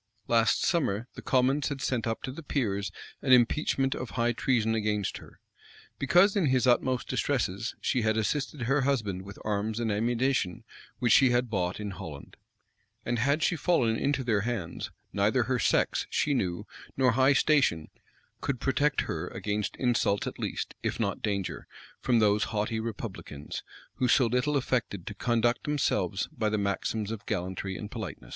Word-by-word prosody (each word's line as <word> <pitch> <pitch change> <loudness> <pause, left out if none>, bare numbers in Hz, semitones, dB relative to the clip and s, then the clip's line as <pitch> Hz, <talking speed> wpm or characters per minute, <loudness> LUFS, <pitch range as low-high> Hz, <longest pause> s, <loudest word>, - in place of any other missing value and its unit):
Last 115 -1 +3
summer, 120 - 0
the - - -9
commons 135 +2 +2
had 140 -2 -4
sent 125 -3 -1
up 115 - -3
to 130 - -3
the 145 - -8
peers 100 -10 -1 0.3
an 130 - 0
impeachment 135 +2 +3
of 130 - -5
high 120 0 +1
treason 115 -2 +1
against 105 -2 -1
her; - - -15 0.6
because, 175 +9 +4
in 190 -7 +2
his 130 -1 +2
utmost 125 +1 +2
distresses, 115 -5 -1
she 125 - +1
had 110 0 +1
assisted 135 +4 -1
her 135 +4 +2
husband 110 -9 0
with 100 +1 -10
arms 105 +1 -1
and 115 -2 0
ammunition 115 -2 0 0.3
which 120 - +3
she 130 - +6
had 120 -1 +1
bought 90 -2 -1
in 105 -1 -4
Holland.[] 85 -7 -9 0.7
And 120 -1 0
had 140 +6 +2
she - - +2
fallen 140 -8 +2
into 140 +2 0
their 110 -4 +1
hands, 110 -6 -3 0.2
neither - - +2
her - - 0
sex, - - +1
she 145 - +1
knew, 95 -5 -1 0.3
nor 130 -1 +4
high 130 +4 +4
station, 135 - +2 0.5
could 135 -3 -2
protect 145 +3 +1
her 80 +2 -3
against 105 +2 -3
insults 120 -5 +1
at - - -6
least, - - -3
if - - -2
not - - -1
danger, 100 -3 -3 0.3
from 120 - +2
those 105 -1 +3
haughty 110 +1 -2
republicans, 100 -9 -6 0.4
who 125 - +2
so 130 - +5
little 125 +5 +1
affected 120 -8 -1
to - - -5
conduct 120 +2 +1
themselves 105 - 0
by 110 - 0
the 110 - 0
maxims 100 +1 -1
of 115 0 -5
gallantry 95 -1 -3
and 105 +1 -7
politeness. 110 -3 -7
115 Hz, 170 wpm, -29 LUFS, 105-130 Hz, 0.7 s, she